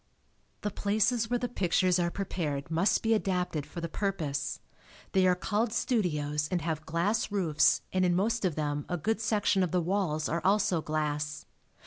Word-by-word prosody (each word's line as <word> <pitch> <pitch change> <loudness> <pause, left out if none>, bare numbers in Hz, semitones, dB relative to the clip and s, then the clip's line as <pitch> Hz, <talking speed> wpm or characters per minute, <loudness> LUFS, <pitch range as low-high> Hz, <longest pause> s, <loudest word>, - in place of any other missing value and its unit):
The 210 - -2
places 220 +4 +1
where 245 - +2
the 245 - -2
pictures 185 -4 +2
are 170 -1 +1
prepared 165 -6 -3
must 170 +5 +2
be 225 0 +3
adapted 180 -7 -1
for 170 - -7
the 170 - -2
purpose. 155 -7 -2 0.5
They 190 -1 +4
are 180 - +4
called 215 +5 -1
studios 150 - 0
and 175 -4 -1
have 160 -2 -3
glass 200 +7 0
roofs 160 -7 +3
and 185 0 +2
in 175 -1 +3
most 225 +4 +1
of 180 -5 0
them 145 -1 -2
a 175 - -1
good 220 +7 -1
section 205 -3 +2
of 180 - +1
the 180 - +1
walls 170 -4 0
are 170 +2 -1
also 190 -3 +2
glass. 150 -1 -2
180 Hz, 175 wpm, -29 LUFS, 155-205 Hz, 0.5 s, They